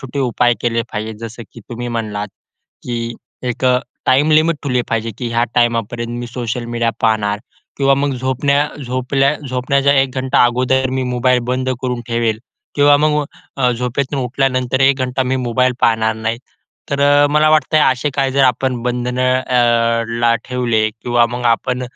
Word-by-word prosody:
छोटे 135 +1 -7
उपाय 120 -2 +2
केले 115 -1 0
पाहिजे. 110 +1 -4
जसं 115 +1 -9
की 115 - -12
तुम्ही 120 0 -5
म्हणलात 105 -3 -3 0.5
की 115 -1 -4 0.3
एक 125 +1 -3
अ, 125 0 +4 0.3
टाइम 145 +4 +3
लिमिट 155 +1 +3
ठेवली 125 -3 0
पाहिजे, 115 0 -1
की 120 - -3
ह्या 115 0 +1
टायमापर्यंत 120 0 0
मी 120 - -5
सोशल 120 0 -4
मीडिया 115 0 +1
पाहणार 105 -2 +1 0.4
किंवा 135 0 +3
मग 140 0 0
झोपण्या 140 +3 +1 0.2
झोपल्या 130 +3 +1
झोपण्याचा 135 +2 +1
1 135 -1 +2
घंटा 130 0 +2
अगोदर 130 +2 +1
मी 130 0 -1
मोबाईल 125 0 +1
बंद 130 +1 -1
करून 125 -2 -2
ठेवेल 115 -2 0 0.4
किंवा 145 0 +5
मग 150 0 +1 0.3
अ, 125 -2 +2
झोपेतून 125 +3 -2
उठल्यानंतर 130 0 0
1 135 0 +4
घंटा 130 +1 -1
मी 130 +1 -1
मोबाईल 125 0 +1
पाहणार 110 -1 +2
नाही. 115 +1 -3 0.5
तर 140 0 -1
अ, 145 0 +5
मला 150 +1 +4
वाटतंय 155 0 +3
असे 130 +4 -3
काही 135 -1 0
जर 140 0 +3
आपण 125 -1 0
बंधनं 125 +1 0
अ, 115 -2 +2 0.2
ला 115 0 +4
ठेवले 120 -4 0
किंवा 120 +1 +1
मग 125 0 -5
आपण 125 +2 -4
125 Hz, 165 wpm, -17 LUFS, 120-135 Hz, 0.5 s, किंवा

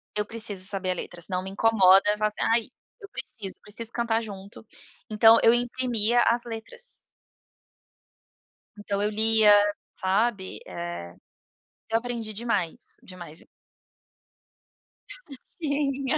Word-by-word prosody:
Eu 210 - 0
preciso 205 -4 -4
saber 190 -2 -1
a - - +1
letra, 175 0 -8
senão 185 +1 -3
me 190 - -6
incomoda, 195 -2 +5
eu 210 - -2
falo, 215 - +2
assim: 210 - -7
"Ai, 230 +1 +3 0.4
eu 400 - -11
preciso, 225 - -7
preciso 220 +2 -6
cantar 235 -1 0
junto". 200 0 -10 0.4
Então 225 +1 +6
eu 230 - +7
imprimia 240 -1 +1
as 235 +1 +2
letras. 230 - -8 2.0
Então 205 -1 -3
eu 210 - +1
lia, 220 0 +4 0.4
sabe, 195 +1 -1
eh, 170 - -6 0.8
eu 225 - +3
aprendi 230 -2 -5
demais. 225 -2 -3
Demais, 175 -4 -11
e - - -18 2.0
Tinha. 280 -3 -1
220 Hz, 120 wpm, -26 LUFS, 195-235 Hz, 2.0 s, eu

